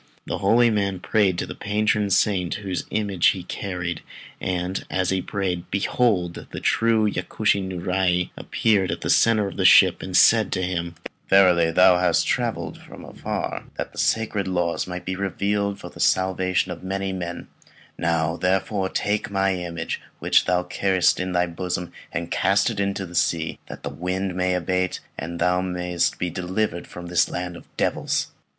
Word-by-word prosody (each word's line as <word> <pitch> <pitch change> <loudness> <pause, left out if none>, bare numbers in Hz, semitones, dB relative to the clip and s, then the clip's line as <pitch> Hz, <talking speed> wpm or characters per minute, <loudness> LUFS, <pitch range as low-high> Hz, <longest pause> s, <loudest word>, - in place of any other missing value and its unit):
Then - - -4
the - - -1
holy 115 +4 +4
man 100 -3 0
prayed 95 -2 +2
to - - -1
the - - -7
patron 105 0 0
saint 95 -2 +1
whose 95 -4 -4
image 100 -5 +1
he 95 -2 +1
carried, 90 -3 -4 0.4
and 90 +1 -2
as 95 -1 0
he 95 -1 0
prayed, 90 -4 -3
behold 100 -3 0
the - - -6
true 115 -1 +2
Yakushi 100 +2 0
Niurai 90 -1 0
appeared 100 -4 +1
in 85 +1 -2
the - - -1
centre 110 -2 +4
of - - -8
the 95 - 0
ship, 95 -1 +6
and 95 -1 0
said 110 -3 +5
to 95 - -1
him 85 -2 -3 0.3
"Verily, 90 -4 +5
thou 90 +1 +5
hast 90 - +2
travelled - - -2 0.4
far - - -3
that - - -4
the - - -9
sacred 105 -3 0
laws 90 -2 -1
might 90 0 -6
be 95 - -2
revealed 100 +1 -1
for - - -9
the - - -14
salvation 95 0 +1
of 85 - -7
many 95 0 -2
men; 85 -2 -5 0.5
now, 80 -1 0
therefore, 95 +1 0
take 105 +2 -1
my 95 -1 +1
image, 85 -2 -4 0.2
which - - +3
thou 90 -1 +1
carriest 95 -1 +1
in 90 0 -2
thy 90 0 +2
bosom, 90 0 -4 0.2
and 85 0 -4
cast 100 +4 +2
it 105 - -5
into 100 -1 -1
the 90 - -11
sea, 85 -1 0
that - - -9
the - - -3
wind 90 +2 -3
may 90 0 0
abate, 90 +1 -1 0.2
and 80 +3 -5
that - - +1
thou 90 0 +2
mayest 90 -1 -1
be 90 -1 -2
delivered 90 0 -2
from 90 - -9
this 85 0 +2
land 90 0 -4
of - - -12
devils." - - 0
95 Hz, 175 wpm, -23 LUFS, 90-100 Hz, 0.5 s, ship